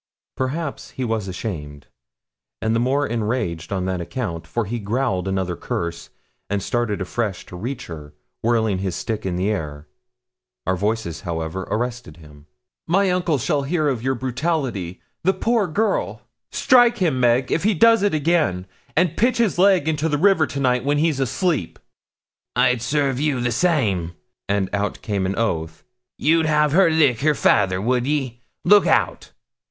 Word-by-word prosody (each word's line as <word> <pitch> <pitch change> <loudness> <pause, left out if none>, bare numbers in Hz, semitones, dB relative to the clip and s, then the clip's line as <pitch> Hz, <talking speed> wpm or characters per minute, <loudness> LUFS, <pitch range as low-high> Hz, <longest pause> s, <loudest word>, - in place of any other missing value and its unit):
Perhaps 140 +3 -3
he 130 - -1
was 110 -4 -2
ashamed, 75 - -6 0.7
and 110 +1 0
the - - +2
more 135 +4 +1
enraged 105 - -2
on 95 -2 -1
that 95 -1 -2
account, 85 -3 -4
for 115 -2 -2
he 115 +4 -3
growled 105 -3 -1
another 95 -2 -1
curse, 85 -1 -4 0.4
and 100 -1 -1
started 120 -4 -1
afresh 100 +1 -3
to - - -11
reach 125 +7 -5
her, 75 -3 -10 0.3
whirling 110 -4 +1
his 95 -3 -2
stick 110 0 -3
in 90 - -2
the 95 +4 0
air. 75 -6 -5 0.8
Our 95 - +1
voices, 105 -3 -2
however, 85 0 -4
arrested 120 -6 -3
him. 75 -2 -16 0.4
'My 190 +2 +3
uncle 180 -4 +1
shall 140 +4 0
hear 155 +2 0
of 125 -5 -2
your 130 +2 0
brutality. 130 - -2 0.2
The 190 +3 +2
poor 225 -4 +1
girl!' 210 +7 -1 0.3
'Strike 245 -2 +4
him, 165 - +1
Meg, 125 +1 +2
if 165 - +1
he 210 +1 +2
does 230 +5 +5
it 205 -5 +2
again; 150 - +1 0.3
and 170 -1 +2
pitch 245 +3 +2
his 225 -6 +1
leg 185 -5 +4
into 160 0 0
the 150 - +1
river 175 -2 +4
to 140 - -5
night, 125 -2 +2
when 145 +2 +1
he's 155 -2 +1
asleep.' 135 - -1 0.8
'I'd 125 -1 +3
serve 135 +1 0
you 145 -3 0
the 120 0 0
same;' 110 - +1 0.4
and 100 -1 +1
out 100 0 -2
came 100 -5 -1
an 95 - -2
oath. 80 -8 -2 0.3
'You'd 160 +1 +3
have 150 -1 +3
her 180 +2 +5
lick 145 -7 +3
her 150 +1 +3
fayther, 95 -7 +3
would 125 +4 0
ye? 135 -5 -2 0.2
Look 205 +3 +6
out!' - - +1
120 Hz, 170 wpm, -22 LUFS, 95-155 Hz, 0.8 s, Look